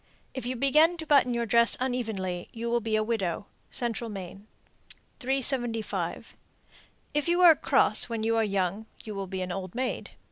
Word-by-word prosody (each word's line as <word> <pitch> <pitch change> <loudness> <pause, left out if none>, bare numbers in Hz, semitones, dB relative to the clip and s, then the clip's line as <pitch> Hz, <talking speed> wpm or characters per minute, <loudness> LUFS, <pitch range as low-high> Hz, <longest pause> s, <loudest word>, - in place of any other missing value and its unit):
If 260 -2 -5
you 255 - -2
begin 305 +7 +4
to 320 - -6
button 280 -4 +4
your 235 -1 -1
dress 235 +1 +3
unevenly, 220 -9 -3
you 235 0 -4
will 240 - +2
be 220 -1 -1
a 215 - +2
widow. 205 -4 -2 0.2
Central 235 -1 -2
Maine. 195 0 -8 0.7
375. 250 -4 -1 0.8
If 295 +1 0
you 345 +1 +2
are 340 -3 +9
cross - - +3
when 225 -1 -3
you 225 +1 +1
are 225 - +3
young, 200 +1 -1 0.2
you 215 - -6
will 195 -1 -4
be 185 0 -4
an 180 - -5
old 185 +1 -5
maid. 255 0 -3
230 Hz, 175 wpm, -28 LUFS, 200-255 Hz, 0.8 s, are